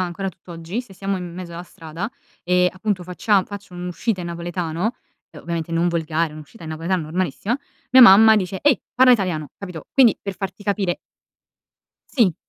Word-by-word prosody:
ancora 185 +2 -2
tutt'oggi, 170 +5 -6
se 225 -6 -14
siamo 195 0 -2
in 175 -1 -7
mezzo 180 -2 -7
alla 170 +1 -6
strada, 165 +5 -7 0.3
e, 180 0 +3
appunto, 185 -1 -2
faccia 185 +3 +1
faccio 200 -3 -10
un'uscita 180 +3 -3
in - - -5
napoletano 170 +4 -3 0.4
uhm, - - -12
ovviamente 165 -1 -4
non 170 +1 +2
volgare, 165 -1 -1
un'uscita 155 +2 -12
in 160 - -6
napoletano 165 +2 -1
normalissima, 180 - -2 0.4
mia 260 0 +9
mamma 220 +1 +9
dice: 190 -1 -1
"Ehi, 285 -7 +4
parla 255 0 +7
italiano." 180 -9 0
Capito, 180 -6 -8
quindi 250 -5 +5
per 195 -1 -4
farti 195 +1 -6
capire 200 -3 0 1.2
Sì. 195 -10 +4
180 Hz, 170 wpm, -22 LUFS, 170-200 Hz, 1.2 s, mia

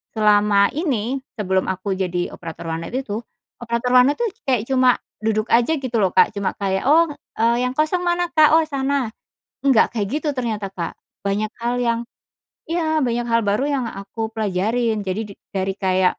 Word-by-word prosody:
selama 210 -1 +4
ini 270 - -1 0.2
sebelum 190 -2 +1
aku 190 +1 -3
jadi 180 -2 -2
operator 165 0 -8
warnet 165 +1 -4
itu, 225 -5 -3 0.4
operator 235 +1 -1
warnet 255 +3 +5
tuh 475 - +1 0.2
kayak 245 -5 +1
cuma 255 -2 +4 0.2
duduk 215 0 0
aja 240 +7 +4
gitu 255 -3 -4
loh 190 -2 +2
Kak - - +5
cuma 200 -1 -1
kayak, 195 -1 0
"Oh," 330 +3 +6 0.3
eee, 235 +2 +3
"yang 250 - -1
kosong 310 +4 +1
mana 350 0 +1
Kak?" 310 -1 +6
"Oh 325 - +4
sana," 275 -3 -1 0.6
nggak 255 -4 +4
kayak 205 -3 0
gitu 300 +3 -1
ternyata 220 -5 -2
Kak. 170 -3 -5 0.3
Banyak 205 +2 -1
hal 240 +1 0
yang 235 -1 +1 0.7
iya, 320 -2 0
banyak 240 -1 0
hal 230 0 +3
baru 205 +6 +1
yang 275 -3 0
aku 220 +2 -6
pelajarin 220 +3 0
jadi 190 +4 -1
di 200 - -10 0.2
dari 195 0 -1
kayak 185 -1 +2
230 Hz, 175 wpm, -21 LUFS, 200-265 Hz, 0.7 s, Oh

